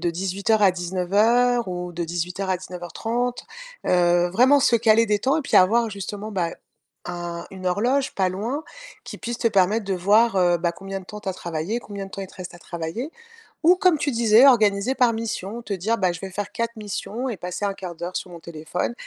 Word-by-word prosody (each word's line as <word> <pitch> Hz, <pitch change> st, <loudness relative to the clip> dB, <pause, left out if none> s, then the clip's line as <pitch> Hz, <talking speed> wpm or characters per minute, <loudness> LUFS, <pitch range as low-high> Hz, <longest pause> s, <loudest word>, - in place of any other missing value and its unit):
de 175 Hz, -, 0 dB
18:00 195 Hz, +5 st, 0 dB
à 190 Hz, -, +6 dB
19:00 205 Hz, +7 st, +2 dB
ou 180 Hz, -1 st, -4 dB
de 170 Hz, +1 st, -3 dB
18:00 175 Hz, +3 st, -3 dB
à 185 Hz, -, +2 dB
19:30», 225 Hz, +8 st, -4 dB, 0.4 s
heu, 175 Hz, -1 st, +3 dB
vraiment 255 Hz, +9 st, +5 dB
se 245 Hz, -, +3 dB
caler 225 Hz, 0 st, +4 dB
des 210 Hz, -1 st, +2 dB
temps 270 Hz, +4 st, +2 dB
et -, -, -2 dB
puis 280 Hz, -, +1 dB
avoir, 230 Hz, +5 st, +5 dB
justement, 205 Hz, +2 st, -6 dB
bah, 175 Hz, -4 st, -1 dB, 0.6 s
un 175 Hz, -1 st, -5 dB
une 185 Hz, -1 st, -7 dB
horloge 250 Hz, +9 st, 0 dB
pas 190 Hz, -2 st, +2 dB
loin 230 Hz, +11 st, -3 dB, 0.4 s
qui -, -, -8 dB
puisse 240 Hz, 0 st, -4 dB
te 240 Hz, -, 0 dB
permettre 205 Hz, +1 st, +2 dB
de 195 Hz, -1 st, -1 dB
voir, 210 Hz, +6 st, +3 dB
heu, 175 Hz, -2 st, +3 dB
bah, 170 Hz, 0 st, 0 dB
combien 195 Hz, +2 st, -6 dB
de -, -, -14 dB
temps 210 Hz, +2 st, -8 dB
tu 195 Hz, -, -6 dB
as -, -, 0 dB
travaillé, 170 Hz, +5 st, -3 dB
combien 200 Hz, -3 st, -7 dB
de -, -, -14 dB
temps 195 Hz, -, -7 dB
il -, -, -6 dB
te -, -, -17 dB
reste 180 Hz, -1 st, -8 dB
à -, -, -12 dB
travailler. 170 Hz, -, -5 dB, 0.5 s
Ou, 345 Hz, +3 st, +7 dB
comme 365 Hz, -3 st, +3 dB
tu 285 Hz, 0 st, -1 dB
disais, 230 Hz, +1 st, +5 dB
organiser 215 Hz, -2 st, +4 dB
par 245 Hz, -3 st, +3 dB
mission, 225 Hz, -1 st, -4 dB
te 210 Hz, -, -4 dB
dire: 205 Hz, +5 st, 0 dB
«Bah, 185 Hz, -2 st, +2 dB
je 175 Hz, -, -7 dB
vais 195 Hz, -, -5 dB
faire 200 Hz, +1 st, -4 dB
4 230 Hz, 0 st, -3 dB
missions 215 Hz, +3 st, -4 dB
et 225 Hz, -, -4 dB
passer 180 Hz, +4 st, -4 dB
1/4 190 Hz, -3 st, -4 dB
d'heure 175 Hz, +2 st, -6 dB
sur -, -, -6 dB
mon 170 Hz, -, -9 dB
téléphone 165 Hz, +5 st, -4 dB
200 Hz, 215 wpm, -23 LUFS, 180-230 Hz, 0.6 s, Ou